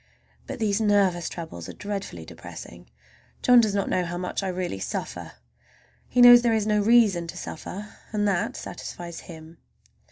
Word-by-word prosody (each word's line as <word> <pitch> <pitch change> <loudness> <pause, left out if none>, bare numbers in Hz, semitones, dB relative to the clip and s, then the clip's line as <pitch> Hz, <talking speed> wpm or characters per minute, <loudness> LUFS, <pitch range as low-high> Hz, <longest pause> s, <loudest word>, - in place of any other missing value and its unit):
But - - -5
these 215 -2 0
nervous 195 -5 +2
troubles 160 - -8
are - - -7
dreadfully 205 -1 -6
depressing. - - -11 0.5
John 250 -1 +7
does 210 -3 0
not 200 - 0
know 180 - 0
how 175 0 -4
much 180 +2 -3
I 195 - -3
really 180 - -3
suffer. - - -5 0.8
He 250 - +3
knows 245 0 +10
there 235 -2 +2
is 215 -2 0
no 210 -1 +2
reason 205 -6 +4
to - - -8
suffer, 205 +6 -8
and 210 -1 0
that 190 -4 -1
satisfies 175 -1 -7
him. 160 -1 -12
200 Hz, 165 wpm, -25 LUFS, 175-215 Hz, 0.8 s, knows